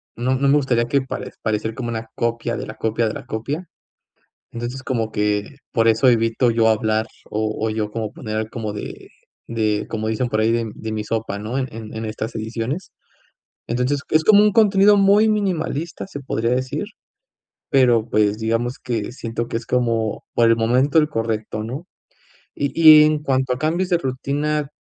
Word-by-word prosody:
no 125 +3 0
no 140 +2 +1
me 140 - +5
gustaría 125 -5 +1
que 140 +3 +1
pare 130 - -6
parecer 110 0 -1
como 120 -2 -4
una 115 -1 -4
copia 115 0 -1
de - - -5
la 110 - -8
copia 115 +1 0
de 110 - -3
la - - -8
copia. 145 +11 -4 0.8
Entonces, 120 +3 -5
como 115 -4 -2
que 105 +5 -1
por 115 -1 +2
eso 115 +3 +5
evito 115 +1 +2
yo 115 0 +3
hablar, 110 0 +1 0.2
o 110 0 -1
o - - 0
yo 110 -1 -2
como 110 -1 -3
poner 110 -1 -4
como 110 -3 -4
de 105 - -8 0.4
de, 110 -2 0
como 110 -1 -3
dicen 110 +3 -1
por 110 - 0
ahí, 110 +1 +3
de 115 -2 -1
de 110 - -6
mi 110 -1 -2
sopa, 110 -2 -3
¿no?, 110 +5 -4
en 130 -1 -1
en 110 -1 -8
en 110 0 -4
estas 110 +1 -5
ediciones. 115 - -4 0.8
Entonces, 125 +4 0
es 155 0 +3
como 210 +1 +7
un 210 - +4
contenido 205 -1 +5
muy 200 +2 +5
minimalista, 175 -6 -2
se 160 -7 -7
podría 115 -3 -1
decir, 130 +7 -1 0.9
pero, 120 -4 +4
pues, 105 0 +2
digamos 115 +3 -1
que 120 -3 -3
siento 115 -2 -4
que - - -3
es 115 - -12
como, 115 -3 0
por 115 -1 +4
el 115 - +4
momento, 125 +7 +2
el 150 -1 +4
correcto, 110 -4 -3
¿no? 135 +10 -6 0.7
Y 140 -1 -2
y 155 -2 +9
en 150 -1 +1
cuanto 130 -2 0
a - - -8
cambios 165 +5 0
de 175 - +3
rutina, 145 +2 -2
120 Hz, 190 wpm, -21 LUFS, 110-140 Hz, 0.9 s, y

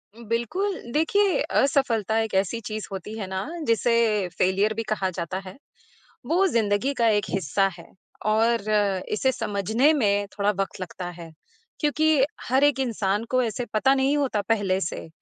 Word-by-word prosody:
बिल्कुल। 235 - -2
देखिए, 370 +7 +2
असफलता 230 -6 +2
एक 225 -1 -2
ऐसी 195 +4 +1
चीज़ 215 -1 -5
होती 195 +3 -6
है 210 - -4
ना, 190 +4 -4 0.2
जिसे 230 -4 +2
फ़ेलियर 195 +4 +2
भी 225 +1 -3
कहा 195 -3 0
जाता 180 0 -4
है। 185 - -10 0.7
वो 365 +4 +2
ज़िंदगी 230 - +1
का 235 -3 +2
एक 205 -2 +2
हिस्सा 195 +2 +1
है 170 - -12 0.4
और 220 0 +2 0.4
इसे 260 +5 +2
समझने 220 - +1
में 205 -7 +1
थोड़ा 205 0 +2
वक़्त 195 - -2
लगता 180 0 -6
है, 170 -2 -10 0.5
क्योंकि 305 -2 +3 0.2
हर 265 +3 +3
एक 290 -2 +3
इंसान 215 -5 0
को 255 0 +2
ऐसे 235 +2 -3
पता 265 +5 +4
नहीं 275 +2 +2
होता 265 -8 0
पहले 200 -4 +1
से, 160 - -4
220 Hz, 160 wpm, -25 LUFS, 200-265 Hz, 0.7 s, पता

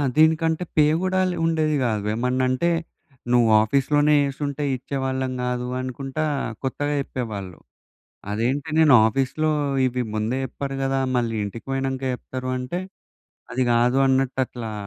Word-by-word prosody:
దీనికంటే 160 +2 +3
పే 150 - +6 0.2
కూడా 185 0 +1
లే - - -4
ఉండేది 155 -2 +1
కాదు. 105 -3 -1
ఏమన్నా 125 +2 0
అంటే, 170 +7 +1 0.6
"నువ్వు 120 -2 +4
ఆఫీస్‌లోనే 145 +5 +3
చేసుంటే 140 +1 -3
ఇచ్చేవాళ్ళం 130 0 -2
కాదు" 125 0 -2
అనుకుంటా 135 +4 -3 0.4
కొత్తగా 145 +2 -1
చెప్పేవాళ్ళు. 105 -9 -5 0.8
అదేంటి 130 +8 -1
నేను 150 -4 +6
ఆఫీస్‌లో 135 +6 0 0.3
ఇవి 125 0 -1
ముందే 110 +4 -1
చెప్పారు 135 +1 -5
కదా, 135 0 0 0.2
మళ్ళీ 115 -2 0
ఇంటికి 100 +3 -7
పోయినాక 135 0 -2
చెప్తారు 130 +1 -6
అంటే, 150 +9 -3 0.7
"అది 130 - +1
కాదు" 125 +3 +3
అన్నట్టు, 130 0 +1
అట్లా 115 -3 -7
130 Hz, 130 wpm, -23 LUFS, 125-145 Hz, 0.8 s, పే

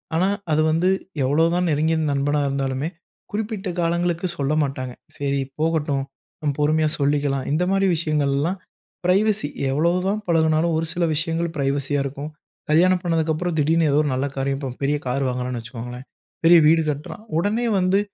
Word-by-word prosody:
ஆனா 185 +3 +3 0.2
அத 155 - +3
வந்து 170 +4 +2 0.3
எவ்வளோதான் 165 +6 +2
நெருங்கிய 155 +2 +2 0.2
நண்பனா 145 +1 +1
இருந்தாலுமே, 135 +2 -1 0.4
குறிப்பிட்ட 210 -2 -3
காலங்களுக்கு 170 +1 0
சொல்ல 140 +1 0
மாட்டாங்க. 130 -2 -4 0.2
சரி 140 -1 -1 0.2
போகட்டும், 150 -4 0 0.6
பொறுமையா 155 +1 +2
சொல்லிக்கலாம். 140 -2 +1
இந்தமாரி 190 +5 +2
விஷயங்கள்லாம் 155 +2 0 0.5
பிரைவசி 200 -1 +2 0.2
எவ்வளவு 170 +5 +2
தான் 210 +2 0
பழகுனாலும் 160 0 +2
ஒரு 165 - 0
சில 175 - -1
விஷயங்கள் 165 +2 -1
பிரைவசியா 140 +1 0
இருக்கும். 140 +2 -5 0.4
கல்யாணம் 180 +4 +4
பண்ணதுக்கு 165 -2 +1
அப்றம் 175 +1 -2
திடீருன்னு 160 +1 +3
ஏதோ 145 - +3
ஒரு 145 - -1
நல்ல 130 +2 0
காரியம். 135 0 -1
இப்போ 135 - -4
பெரிய 145 +2 +2
கார் 135 +2 0
வாங்குகிறான்னு 125 -1 -2
வச்சுக்கோங்களேன். 120 +2 -8 0.4
பெரிய 175 +1 +8
வீடு 165 +1 +5
கட்டுறான். 150 +9 -5 0.2
உடனே 215 +7 0
வந்து 185 +2 +3
155 Hz, 145 wpm, -22 LUFS, 140-170 Hz, 0.6 s, பெரிய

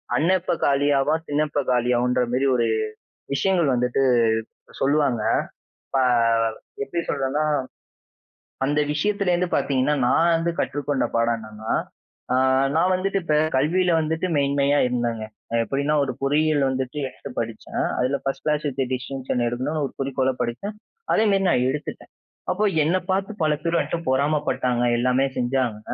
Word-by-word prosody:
அண்ணன் 185 +4 +3
எப்ப 170 - -1
காலியாவான், 145 +2 +2
திண்ண 145 +1 +1
எப்ப 145 - 0
காலியாவுன்றமாரி 125 +1 +1
ஒரு 120 -1 +2 0.7
விஷயங்கள் 165 -2 +2
வந்துட்டு 125 +2 +1 0.8
சொல்லுவாங்க. 140 -5 +2 0.6
இப்ப 135 - 0 0.8
எப்பிடி 170 +5 -3
சொல்றன்னா! 140 +2 0 1.2
அந்த 145 +2 +1
விஷயத்திலேருந்து 180 +1 0
பார்த்தீங்கன்னா, 140 +2 +1
நான் 170 +6 +3
வந்து 165 +1 0
கற்றுக்கொண்ட 145 -1 -1
பாடம் 115 0 +2
என்னன்னா? 110 0 -6 0.6
ஆ, - - +2 0.4
நான் 180 +3 +3
வந்துட்டு 195 +2 0
இப்ப 155 -3 +1 0.2
கல்வியில 175 +7 +2
வந்துட்டு 160 +3 -1
மேன்மையா 140 0 +2
இருந்தேங்க. 120 -3 -2 0.3
அ, - - -2
எப்பிடின்னா, 140 +5 -1
ஒரு 130 - -3
பொறியியல் 145 +1 +2
வந்துட்டு 130 +2 -3
எடுத்து - - -10
படிச்சேன். - - -3 0.2
அதில 135 +2 +1
ஃபர்ஸ்ட் 135 - -3
கிளாஸ் 150 0 0
வித் 135 0 -4
டிஸ்டிங்ஷன் 130 -1 -3
எடுக்கணுன்னு 135 +6 -2
ஒரு - - -9
குறிக்கோள்ல 135 -1 0
படிச்சேன். 195 - -4 0.4
அதேமாரி 200 -3 +3
நான் 125 -4 +2
எடுத்துட்டேன். 150 +2 -6 0.4
அப்போ 205 +4 0 0.2
என்ன 170 +4 +2
பார்த்து 195 +3 0
பல 155 -1 +3
பேரு 170 0 +1
என்ட்ட 170 - -3
பொறாம 145 +3 +2
பட்டாங்க. 125 -1 0
எல்லாமே 125 +2 +2
செஞ்சாங்க. 125 -3 0
140 Hz, 135 wpm, -23 LUFS, 125-160 Hz, 1.2 s, அண்ணன்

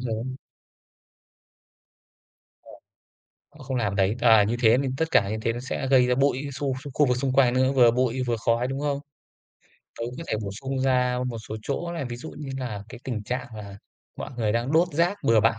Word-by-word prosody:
đấy. 110 - -3 2.4
Đúng - - -14 0.9
rồi. 140 - -11
Không 130 - -2
làm 105 -5 -1
đấy. 100 +3 +2
À, 110 -3 +6
như 115 +4 -1
thế 115 +1 +6
thì 135 - -1
tất 160 +3 -1
cả 100 -7 +3
như 110 - -1
thế 115 - +1
nó 120 - -5
sẽ 130 +1 -3
gây 130 -2 +6
ra 125 - +2
bụi 135 0 +2
xu 135 0 -2 0.2
khu 150 - +4
vực 125 0 +2
xung 130 0 -1
quanh 130 -2 +4
nữa, 130 +1 +3
vừa 125 -3 +6
bụi 125 +1 0
vừa 120 -1 0
khói, 115 +2 +1
đúng 135 +1 -3
không? 145 -1 -1 1.0
Tớ - - -4
cũng 125 - -6
có - - -5
thể - - 0
bổ 100 - -4
sung 135 0 -3
ra 125 -1 +2
một 115 -2 -4
số 110 - -4
chỗ 170 +7 -3
này, 165 -5 -3
ví 120 -1 -5
dụ 160 +6 -8
như 145 -2 -6
là 115 -6 -4
cái 120 0 -10
tình 115 -5 -3
trạng 125 +3 -3
là 100 -2 -8 0.4
mọi - - -6
người 110 -3 0
đang 120 +5 -1
đốt 170 +2 +4
rác 170 +6 +2
bừa 115 -1 +5
bãi 115 +1 +2
125 Hz, 220 wpm, -25 LUFS, 115-135 Hz, 2.4 s, À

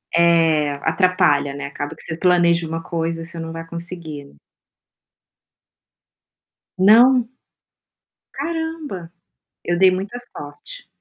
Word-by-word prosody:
É, 165 -3 +3
atrapalha, 160 -5 +2
né. 140 0 -6
Acaba 145 +2 -6
que - - -13
você 160 -1 -4
planeja 170 -2 +3
uma 165 +1 -4
coisa 165 0 -3
você 165 0 -7
não 165 0 -5
vai 165 0 -7
conseguir. 165 - -8 2.4
Não? 235 +5 +6 1.1
Caramba! 310 - -5 0.5
Eu 175 0 0
dei 190 0 +6
muita 195 +6 -4
sorte. 245 - -10
170 Hz, 105 wpm, -20 LUFS, 160-190 Hz, 2.4 s, Não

